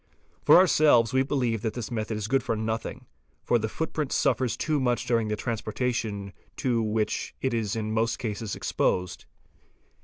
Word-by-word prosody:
for - - +7
ourselves 150 - +5
we 130 - +4
believe 125 -5 0
that 110 -1 -2
this 120 -1 -5
method 110 -1 -2
is 105 -1 -3
good 135 +3 +2
for 115 - -1
nothing, 110 +1 -4 0.4
for 120 - +2
the 110 0 -2
footprint 155 +1 -3
suffers 130 -3 +1
too 155 -2 0
much 125 -2 0
during 115 -2 +1
the 105 - -1
transportation 110 -2 -3 0.2
to 120 -3 +1
which 110 0 -1
it 130 -2 -1
is 110 -3 -1
in 110 -1 -2
most 115 +1 0
cases 110 -3 -4
exposed. 90 -1 -1
115 Hz, 165 wpm, -27 LUFS, 110-125 Hz, 0.4 s, for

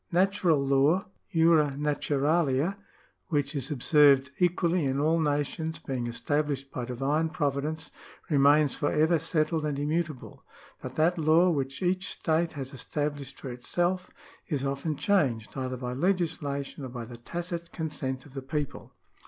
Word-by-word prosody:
— - - -48
" - - -40
Natural 190 -5 +2
law 140 +7 +3 0.3
{jura 160 -5 +4
naturalia), 150 +2 +1 0.5
which 145 -5 0
is 140 -1 -2
observed 140 -1 +4
equally 175 -1 +2
in 135 +1 0
all 160 +3 +2
nations, 150 +2 -1
being 125 -4 -4
estabhshed 140 +2 -2
by 125 - -4
divine 140 +6 0
providence, 150 0 -2 0.4
remains 145 0 +4
for 145 - -1
ever 160 +2 +3
settled 155 0 0
and 150 -2 -1
immutable; 155 -1 -3 0.4
but - - -7
that 165 +3 +2
law 160 +3 +5
which 140 +1 -2
each 185 +1 0
state 165 +1 0
has 135 -2 -6
established 145 +1 -4
for 130 - -6
itself 175 +9 -1 0.4
is 140 -4 -1
often 140 +3 -2
changed, 140 - +1
either 130 -1 -3
by 125 0 -4
legislation 150 -4 -1
or 130 - -5
by 120 -1 -6
the 120 +1 -10
tacit 170 +6 -5
consent 135 -5 -4
of 140 - -15
the 135 - -5
people." 145 +1 -4
150 Hz, 150 wpm, -28 LUFS, 135-165 Hz, 0.5 s, law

